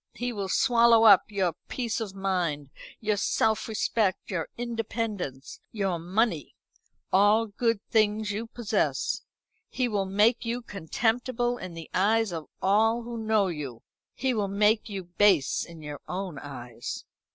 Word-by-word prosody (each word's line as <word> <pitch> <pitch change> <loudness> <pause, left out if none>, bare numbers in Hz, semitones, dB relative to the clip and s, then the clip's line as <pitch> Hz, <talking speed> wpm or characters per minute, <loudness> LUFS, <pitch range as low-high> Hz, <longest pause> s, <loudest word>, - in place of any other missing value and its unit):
He 245 0 -3
will 200 -3 -4
swallow 235 0 +5
up 205 -4 +8
your 190 -5 0
peace 235 -3 -2
of 200 -3 -5
mind, 175 -8 -1 0.3
your 215 -1 0
self 220 +2 +1
respect, 215 -2 0
your 165 -4 -2
independence, 225 - -4
your 195 -5 -1
money 180 - -1 0.6
all 205 +4 +5
good 225 +1 0
things 215 -1 +2
you 220 +3 -4
possess. 230 -2 -1 0.5
He 255 -1 0
will 200 -4 -1
make 210 +6 +3
you 235 +1 -3
contemptible 240 +5 -1
in 180 -2 -7
the 165 -1 -8
eyes 220 +2 +2
of 160 -2 -5 0.2
all 225 +4 +3
who 235 0 -6
know 220 -2 +2
you. 140 -8 -6 0.3
He 260 +1 0
will 210 -3 0
make 210 +3 +2
you 195 -2 -4
base 175 -4 +3
in 165 -2 -11
your 150 -1 -6
own 180 -5 -4
eyes." 125 -5 -7
205 Hz, 145 wpm, -27 LUFS, 180-225 Hz, 0.6 s, up